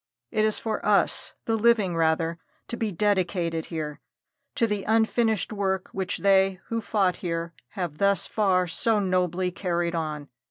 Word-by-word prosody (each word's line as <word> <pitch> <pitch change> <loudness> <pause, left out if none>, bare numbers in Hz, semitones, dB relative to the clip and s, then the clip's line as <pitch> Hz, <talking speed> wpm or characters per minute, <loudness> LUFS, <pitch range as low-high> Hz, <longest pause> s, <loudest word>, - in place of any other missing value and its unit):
It 215 - +2
is 215 - +1
for 220 -2 -3
us 210 -1 +1
the 225 - +1
living, 220 -5 +3
rather, 165 +1 +1 0.3
to - - -3
be 225 -3 -2
dedicated 175 -4 0
here 150 -3 -5 0.6
to 230 - +3
the 210 -3 -2
unfinished 220 -1 +1
work 190 -2 -1
which 190 0 -2
they 195 -1 +3
who 230 0 -1
fought 195 -5 +1
here 170 -1 -3 0.2
have 170 -5 -3
thus 200 0 +3
far 190 -4 +2
so 215 +6 +1
nobly 185 -1 0
carried 175 -2 -1
on. 155 -3 -3
190 Hz, 155 wpm, -26 LUFS, 170-210 Hz, 0.6 s, living